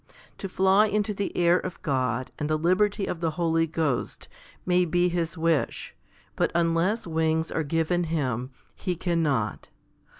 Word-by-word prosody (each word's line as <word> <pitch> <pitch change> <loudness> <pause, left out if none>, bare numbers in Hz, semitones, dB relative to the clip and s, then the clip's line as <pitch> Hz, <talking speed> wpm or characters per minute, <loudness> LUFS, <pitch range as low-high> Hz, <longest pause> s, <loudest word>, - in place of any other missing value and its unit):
To 195 - -5
fly 190 +3 +4
into 210 0 0
the 200 0 -4
air 175 +1 +4
of 185 - -6
God 130 -3 -1
and 150 0 -2
the 155 - +2
liberty 195 +5 +2
of 170 - -4
the 165 -1 0
Holy 165 -1 +2
Ghost 155 -5 -2 0.4
may 180 0 +3
be 175 +1 +2
his 170 -1 -2
wish, 165 -2 0 0.4
but - - +1
unless 170 +6 +1
wings 160 -1 0
are 160 - 0
given 165 +3 0
him, 130 -6 -2 0.3
he 180 -3 -2
cannot. 155 - -1
165 Hz, 155 wpm, -26 LUFS, 160-180 Hz, 0.4 s, fly